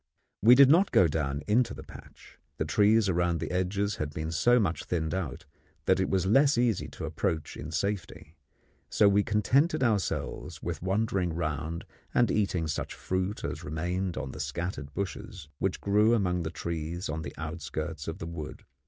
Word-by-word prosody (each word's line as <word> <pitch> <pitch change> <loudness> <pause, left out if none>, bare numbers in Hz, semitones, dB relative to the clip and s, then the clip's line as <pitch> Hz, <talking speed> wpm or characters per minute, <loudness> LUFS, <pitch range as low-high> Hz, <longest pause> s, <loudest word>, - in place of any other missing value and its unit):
We 120 +4 +8
did 140 +1 +8
not 175 +8 +5
go 90 - +6
down 70 -2 -2
into 115 +3 +2
the - - -9
patch. - - -14 0.2
The - - -1
trees 105 +1 +4
around 90 -2 +1
the - - -4
edges 100 +3 0
had 75 -1 -4
been 80 +1 -3
so 120 +10 +4
much 95 -6 -1
thinned 80 -3 -1
out 95 -6 -4 0.4
that - - +3
it - - +1
was 95 -1 +1
less 135 +7 +4
easy 120 -3 +1
to - - -7
approach 80 -2 -2
in 75 - -7
safety; 85 -1 -3 0.5
so 105 - +4
we 100 +1 +4
contented 130 - +2
ourselves 95 -7 -1
with 85 -4 -4
wandering 95 -3 0
round 80 0 -3 0.3
and 120 -3 +4
eating 95 -5 +1
such 80 - -3
fruit 95 +2 -2
as - - -4
remained 90 +4 -2
on 65 - -4
the - - -9
scattered 75 0 -4
bushes 100 -4 -5
which - - -1
grew 105 +3 +3
among 90 -5 0
the 80 - -3
trees 85 +1 -4
on 80 +1 -3
the 70 -3 -7
outskirts 80 -1 -5
of 80 - -4
the - - -6
wood. 80 -2 -7
90 Hz, 180 wpm, -29 LUFS, 80-105 Hz, 0.5 s, We